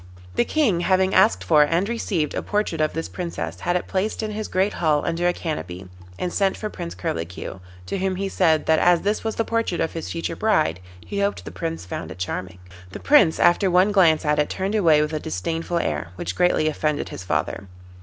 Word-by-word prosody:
The - - +2
King, 245 - +1
having 190 +1 +2
asked 95 0 +4
for 150 +11 +5
and 170 +6 +2
received 200 -9 -1
a - - -2
portrait 205 -6 -1
of 155 - +1
this 165 +1 -3
Princess, 90 - -5
had 175 - -1
it 180 - -1
placed 205 +4 -2
in 215 - -3
his 215 +1 -4
great 190 +2 +1
hall 155 -3 +1
under 170 +1 0
a - - +4
canopy, 95 - -5 0.3
and 180 - -3
sent 195 -1 +1
for 215 -1 -5
Prince 85 +1 -6
Curlicue, 90 +1 -5 0.3
to 195 - -3
whom 190 0 0
he 195 +1 -2
said 165 -5 +2
that 160 0 +3
as 175 -1 +4
this 205 +2 -1
was 220 -1 -2
the 225 - 0
portrait 230 -6 -1
of 165 - -1
his 165 - -5
future 165 0 -3
bride, 155 - +1 0.3
he 200 - -4
hoped 200 0 -1
the - - -7
Prince 165 - -4
found 90 -2 -6
it 80 - -9
charming. 90 0 -4 0.3
The - - -8
Prince 225 - +4
after 185 +3 +4
one 185 +3 +4
glance 170 -7 +4
at 150 0 +2
it 150 - +1
turned 190 +2 -2
away 165 -8 +4
with 150 +1 -4
a 155 - -1
disdainful 165 - -3
air, 75 - -1
which - - -4
greatly 180 -3 +2
offended 150 -1 -1
his - - -7
father. 95 +1 -2
170 Hz, 220 wpm, -23 LUFS, 150-195 Hz, 0.3 s, for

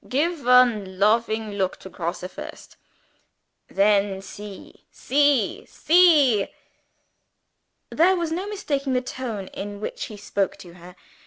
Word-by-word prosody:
Gif 300 +3 -1
one 240 -7 +3
lofing 220 +1 +1
look 195 -2 -2
to - - -12
Grosse 175 -1 -5
first. - - -11 0.9
Then 200 -1 +2
see! 205 0 -11
see! 290 - +1
see!" 300 - +4 1.4
There 365 +4 +4
was 340 -3 -2
no 365 +5 -3
mistaking 285 -10 -2
the 250 - +1
tone 245 -6 -5
in 205 0 -7
which 210 - -5
he 215 - -10
spoke 200 -1 -2
to 175 -2 -13
her. 180 +1 -14
225 Hz, 125 wpm, -23 LUFS, 200-290 Hz, 1.4 s, see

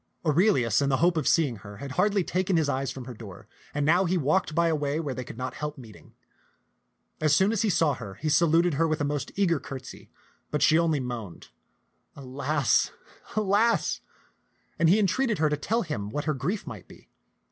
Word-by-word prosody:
Aurelius 150 - +3
in 140 - +1
the 130 - +2
hope 175 +3 +3
of 155 -5 -1
see 165 -3 +4
ing 120 -4 -6
her 100 0 -11
had 140 +3 -7
hardly 200 +5 +2
taken 185 +1 0
his 160 -2 +1
eyes 135 -1 -1
from 130 -2 -7
her 125 - -7
door, 105 -5 -11 0.2
and 145 0 -1
now 175 +5 +4
he 180 +1 +1
walked 155 +1 0
by 170 0 +3
a 165 - +2
way 145 0 -1
where 145 -5 -3
they 130 - -5
could 120 - -10
not 130 +1 -4
help 150 0 -5
meeting. 115 -5 -14 1.1
As 155 -1 +4
soon 190 +2 +3
as 225 - 0
he 220 - +1
saw 165 -5 +2
her, 105 -7 -8
he 155 - -5
saluted 170 +2 +3
her 165 +4 +2
with 155 0 -1
a - - 0
most 145 -1 -2
eager 175 -6 +2
curtsy; 130 -1 -9 0.4
but 150 -1 0
she 160 +2 +5
only 160 -3 +1
moaned, 120 -8 -6 0.7
"Alas, 140 +1 0 0.5
alas! 215 +2 +2 0.4
" - - -41
and 165 - +4
he 190 - +5
entreated 215 +3 +1
her 155 -1 +2
to 150 - 0
tell 225 +10 -1
him 105 - -4
what 145 +6 -4
her 155 - +1
grief 175 +10 -3
might - - -9
be. - - -17
150 Hz, 210 wpm, -27 LUFS, 135-175 Hz, 1.1 s, she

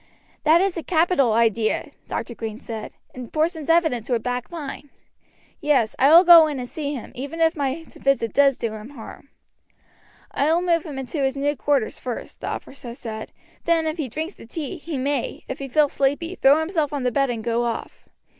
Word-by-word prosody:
"That 320 +3 +6
is 385 -2 0
a - - -2
capital 320 - +2
idea," 225 -1 +1 0.2
Dr. 240 - -4
Green 225 -1 -6
said, 220 -2 -7 0.2
"and 250 -2 -8
Porson's 320 0 -1
evidence 320 -9 +2
would 235 -3 0
back 250 0 -3
mine. 290 -3 -7 0.7
Yes, 280 -7 +2
I 270 - +6
will 335 +3 +9
go 335 -3 +9
in 295 -2 -3
and 250 -1 -5
see 290 +1 -4
him 245 - -8
even 285 +6 -6
if 325 0 +3
my 285 +2 -2
visit 270 -6 0
does 275 -2 +4
do 230 -2 -3
him 215 +2 -8
harm." 275 +1 -11 1.0
"I 290 +3 +1
will 340 +2 +2
move 335 -2 +1
him 295 -4 -7
into 270 +3 -4
his 270 0 0
new 290 +1 0
quarters 275 -3 0
first," 245 -2 -6
the - - -4
officer 250 -4 -6
said; 220 -3 -7 0.3
"then 330 -1 +2
if 315 +1 -2
he 275 -5 -2
drinks 315 - -4
the - - -14
tea 315 +6 -5
he 320 -2 -5
may, 275 0 -2
if 260 - -5
he 275 - -5
feels 295 +2 +2
sleepy, 285 +6 0
throw 280 -5 +5
himself 320 -3 -1
on 285 -3 -3
the 250 - +1
bed 275 +1 +1
and 230 -2 -3
go 235 +1 0
off. 230 -1 -5
280 Hz, 200 wpm, -23 LUFS, 245-320 Hz, 1.0 s, will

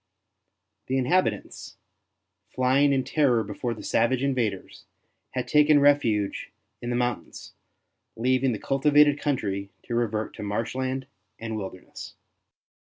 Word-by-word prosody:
The 130 - 0
inhabitants, 130 - -1 0.7
flying 130 +3 +2
in 135 -1 +1
terror 130 -4 +2
before 110 +4 -4
the - - -10
savage 130 +2 +1
invaders, 120 -8 -2 0.5
had 125 -1 -3
taken 150 +2 +5
refuge 120 -8 +2 0.3
in 120 - -4
the 120 - -1
moun 120 -1 -1
tains, - - -12 0.6
leaving 130 +2 +1
the 110 - -2
cultivated 145 +3 +3
country 100 -9 -2
to 120 - -6
revert 110 -2 -1
to - - -7
marshland 130 +6 -2 0.3
and 115 -1 -5
wilderness. 95 -3 -8
125 Hz, 120 wpm, -26 LUFS, 110-140 Hz, 0.7 s, taken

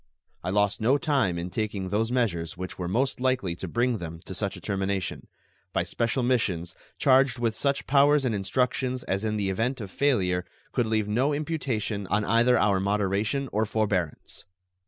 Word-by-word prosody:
I 90 - -2
lost 105 +3 +1
no 125 +6 +4
time 135 - +1
in 90 +1 -4
taking 100 -3 -2
those 110 +4 0
measures 90 -10 -1
which 90 0 -6
were 90 - -2
most 130 +9 0
likely 125 -9 0
to - - -5
bring 120 -1 0
them 85 -1 -6
to - - -6
such 100 +1 -3
a - - -9
termination 95 -3 -2 0.5
by - - +1
special 120 +2 -1
missions 95 -9 0 0.2
charged 135 -3 +4
with 115 -2 0
such 140 +2 0
powers 145 0 +4
and 120 - +1
instructions 125 +5 0
as 95 +2 -2
in 110 -1 -1
the 100 -2 0
event 120 +7 -1
of 100 -4 -7
failure 95 -11 +1 0.3
could 120 -3 0
leave 110 -1 0
no 125 +8 +1
imputation 130 - -2
on 105 +2 +1
either 120 +2 +4
our 100 -3 +3
moderation 105 +6 0
or 110 +2 +1
forbearance. 100 -7 -2
110 Hz, 175 wpm, -27 LUFS, 95-125 Hz, 0.5 s, no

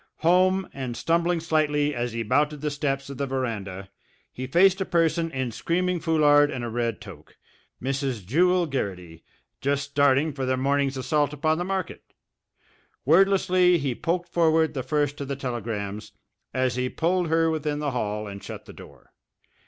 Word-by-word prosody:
Home, 185 +3 +3
and 130 -3 -5
stumbling 170 +5 +1
slightly 150 -2 +1
as 120 -1 -2
he 115 0 -3
mounted 150 +6 +1
the 150 -1 -1
steps 140 -1 -2
of 135 - -9
the 140 - -1
veranda, 100 -7 -4 0.4
he 130 +1 -6
faced 190 +6 +4
a - - +3
person 165 -1 +1
in 130 -5 -3
screaming 175 +9 -1
foulard 150 -3 +4
and 125 -4 -4
a - - -4
red 115 -1 -2
toque, 95 -8 -13 0.4
Mrs. 135 -5 -3
Jewel 180 - +3
Garrity, 90 - -5 0.4
just 140 +1 0
starting 140 +2 +3
for 135 -1 -4
the 130 0 0
morning's 140 0 0
assault 145 +3 0
upon 155 +2 0
the - - -1
market. 190 0 -3 1.0
Wordlessly 185 +2 +4
he 140 -5 -1
poked 175 +7 -2
forward 160 -1 +2
the 135 - -2
first 145 +2 -1
of 140 - -4
the 140 - -3
telegrams 110 -6 -5 0.4
as 130 -1 0
he 125 0 0
pulled 175 +4 0
her 165 0 +2
within 150 -2 -2
the 145 -1 -2
hall 105 -3 -2
and 100 -1 -8
shut - - -8
the - - -12
door. - - -15
145 Hz, 170 wpm, -25 LUFS, 125-165 Hz, 1.0 s, faced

